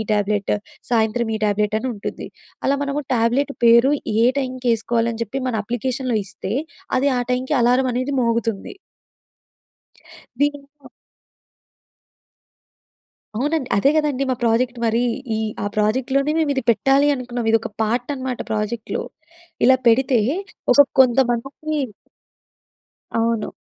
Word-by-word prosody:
Tablet, 205 -1 0 0.4
సాయంత్రం 225 0 +1
ఈ - - -5
tablet 210 +1 +1
అని 260 - -3
ఉంటుంది. 205 - -6 0.4
అలా 275 - +2
మనము 285 +1 -2
ట్యాబ్లెట్ 245 +5 +1
పేరు, 235 +5 +6 0.3
ఏ - - +5
టైంకి 255 -2 -3
వేసుకోవాలి 230 +1 0
అని 230 - -4
చెప్పి 265 +6 -5
మన 240 - -2
అప్లికేషన్‍లో 245 +1 -2
ఇస్తే, 195 0 -6 0.5
అది 280 +2 +2
ఆహ్, 245 - -2
టైంకి 260 +3 0
అలారం 250 +2 +3
అనేది 255 +3 -1
మోగుతుంది. 230 - -1 1.6
మేమింక 285 -1 -3 2.5
అవునండి. 290 +1 -1
అదే 235 +8 +4
కదండీ 295 -3 +1
మా - - +2
ప్రొజెక్ట్ 240 +2 +1
మరి. 230 +1 +2 0.3
ఈ - - -2 0.3
ఆ - - -1
ప్రాజెక్ట్‌లోనే 260 +7 +1
మేము 315 -3 +1
ఇది 265 - -1
పెట్టాలి 270 +5 +3
అనుకున్నాం. 245 -2 -4
ఇది 225 - +5
ఒక - - -5
పార్ట్ 240 +5 -1
అన్నమాట 260 -2 -4
ప్రాజెక్ట్‌లో. 220 +1 -2 0.6
ఇలా 260 +1 +6
పెడితే 250 +1 +4 0.5
అసల 285 -1 +7
కొంతమందికి 265 +4 +1 1.4
అవును. 230 -1 0
245 Hz, 120 wpm, -21 LUFS, 230-270 Hz, 2.5 s, అసల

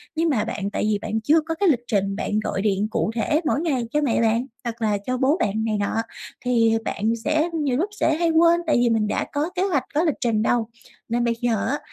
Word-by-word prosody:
Nhưng 325 +1 +1
mà 225 -7 +1
bạn 200 -1 -3
tại - - -1
vì 205 - 0
bạn 220 +1 -2
chưa 315 +6 +4
có 325 +1 -4
cái 390 +1 +2
lịch 255 -7 +3
trình 195 -3 0
bạn 210 0 -1
gọi 195 -2 -2
điện 205 0 +1
cụ 220 - 0
thể 300 +7 +1
mỗi 300 0 +1
ngày 275 -8 0
cho 300 - +2
mẹ 250 -6 +1
bạn, 230 +2 +2 0.2
hoặc 235 -1 -5
là 210 -2 +1
cho 255 0 -1
bố 275 +7 +2
bạn 220 - 0
này 215 -2 0
nọ, 205 - -1 0.5
thì 230 -2 +3
bạn 220 +3 0
sẽ 310 +3 +1
nhiều 265 -4 0
lúc 365 +8 0
sẽ 315 - +2
hay 340 -1 +1
quên, 335 +1 +4
tại - - +3
vì 240 0 +3
mình 220 -2 +1
đã - - -1
có 300 +4 0
kế 365 - +1
hoạch, 335 -9 +1
có 310 - +2
lịch 315 -5 +1
trình 230 -3 +1
đâu. 225 0 +1 0.4
Nên 240 +1 0
bây 235 - +1
giờ 230 -4 0
á, 285 - -1
240 Hz, 255 wpm, -23 LUFS, 220-305 Hz, 0.5 s, chưa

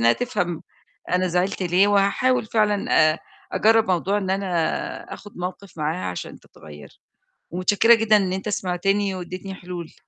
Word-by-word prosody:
إنها 115 +1 +5
تفهم 200 -9 -2 0.5
أنا 180 0 +2
زعلت 180 +2 -1
ليه، 180 +3 +3
وهاحاول 205 +5 +2
فعلًا 205 -7 +3
آآ - - -9 0.3
أجرب 225 +1 +3
موضوع 190 +3 +1
إن 190 -2 -3
أنا 195 0 -1 0.6
آآ - - -6
أخُد 205 -2 -12
موقف 180 0 -7
معاها 155 - -2
عشان 90 - -7
تتغير، 75 -1 -15 0.5
ومتشكرة 205 +6 +4
جدًا 215 -1 +4
إن 190 -2 0
أنت 190 +3 -3
سمعتني 195 +1 0
وأديتني 185 +2 -7
حلول. 175 -2 -8
190 Hz, 150 wpm, -23 LUFS, 180-205 Hz, 0.6 s, إنها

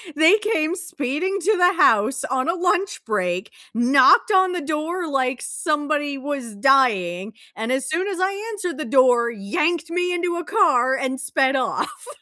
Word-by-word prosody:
they 320 +7 +5
came 360 -6 -1
speeding 350 +2 -3
to 415 +4 +1
the 360 +1 +4
house 220 +5 +3
on 260 +3 -1
a - - +2
lunch 365 +2 -1
break, 185 -2 -2 0.2
knocked 255 - +4
on 375 -1 +3
the 355 -1 -3
door 315 +4 -3
like 260 -3 -1
somebody 295 -2 -2
was 270 -4 -5
dying, 205 -6 +1 0.2
and 225 +3 -4
as 260 0 -1
soon 340 +7 -2
as 385 -3 -4
I 375 +1 0 0.2
answered 365 -5 -5
the 310 - -4
door, 245 -1 +3
yanked 300 - -2
me 355 +1 -1
into 350 0 -2
a 345 - -4
car 265 - +2
and 265 0 -3
sped 270 0 0
off. 265 - -3
290 Hz, 165 wpm, -21 LUFS, 255-355 Hz, 0.2 s, they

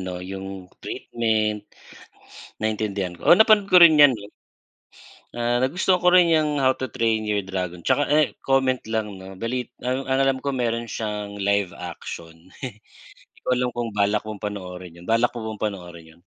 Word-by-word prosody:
'no, 90 -1 -5
yung 95 0 -7 0.2
treatment, 110 -2 -1 1.0
naintindihan 105 -3 -1
ko, - - -9
oo, - - +9
napanood 215 0 +5
ko 180 - +9
rin 160 -3 +8
yan, 145 -3 +8
eh. 100 - -12 1.1
Ah, 120 +1 0
nagustuhan 180 +7 +1
ko 180 - +3
rin 180 -2 +6
yang 155 -2 +2
How 130 -1 +3
to 130 - -2
Train 110 -3 0
Your 105 -2 0
Dragon, 90 -2 -5
tsaka, 145 - +2
eh, 150 0 +3
comment 130 -1 +1
lang 110 -2 -2
'no 95 0 -10
bali 120 +4 -3 0.2
ang 130 +2 -2
ang 130 0 +1
alam 135 -1 +1
ko, 140 -2 -2
meron 115 -1 -1
siyang 105 -2 -4
live 100 -1 +1
action. 85 -1 -9
'Di 110 -6 -10 0.5
ko - - +1
alam 125 0 +1
kung 115 -3 -3
balak 105 +1 +1
kong 110 -2 -7
panoorin 90 -4 -7
'yun. 85 - -14
Balak 115 +4 +1
mo 110 -1 -4
bang 105 - -11
panoorin 90 -4 -10
'yon? 85 - -27
110 Hz, 175 wpm, -23 LUFS, 100-130 Hz, 1.1 s, oo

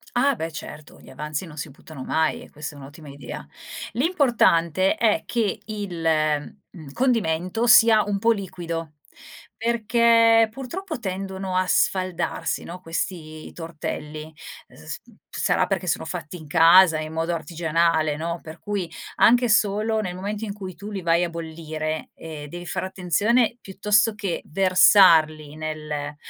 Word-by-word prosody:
Ah, 270 +2 +3
beh, 165 -3 -4
certo, 150 0 -10
gli - - -16
avanzi 150 +5 -5
non 155 -2 -12
si 150 - -5
buttano 140 0 -11
mai 160 0 0
e - - -13
questa 150 0 -8
è - - -12
un'ottima 145 +2 -12
idea. 140 -3 -8 0.5
L'importante 220 - +2
è 220 -3 +2
che 225 -5 -1
il, 200 -6 -5 0.7
mhmm, 155 -6 -11
condimento 225 -3 0
sia 225 -1 +7
un 200 -1 -2
po' 230 +3 +3
liquido 170 -6 -4 0.6
perché 230 0 +4
purtroppo 290 - -6
tendono 190 -2 -4
a 185 - +2
sfaldarsi, 185 -2 0
no, 180 +2 -8
questi 165 -2 -5
tortelli. 155 -1 -6 0.4
Uhm, - - -19
s 80 0 -8
mhmm, - - -20
sarà - - +1
perché - - -2
sono - - -1
fatti 175 +4 -6
in 155 -2 -12
casa 165 +1 +6
in 155 0 -6
modo 165 +1 -1
artigianale, 165 -2 0
no, 170 +1 -3
per 160 +1 -10
cui 200 -5 -3 0.3
anche 245 +1 +4
solo 215 +1 +2
nel 180 -3 -4
momento 205 +3 -4
in 200 - -5
cui 190 -3 -8
tu 205 +1 -9
li 195 -2 -4
vai 170 +1 +2
a - - -4
bollire, 160 -1 -5
ehm, 155 -2 -8
devi 175 +3 -8
fare 155 - -3
attenzione 205 +7 +1
piuttosto 210 +3 +1
che 200 -5 -3
versarli 160 -4 +5
nel 150 -2 -5
175 Hz, 150 wpm, -23 LUFS, 155-210 Hz, 0.7 s, sia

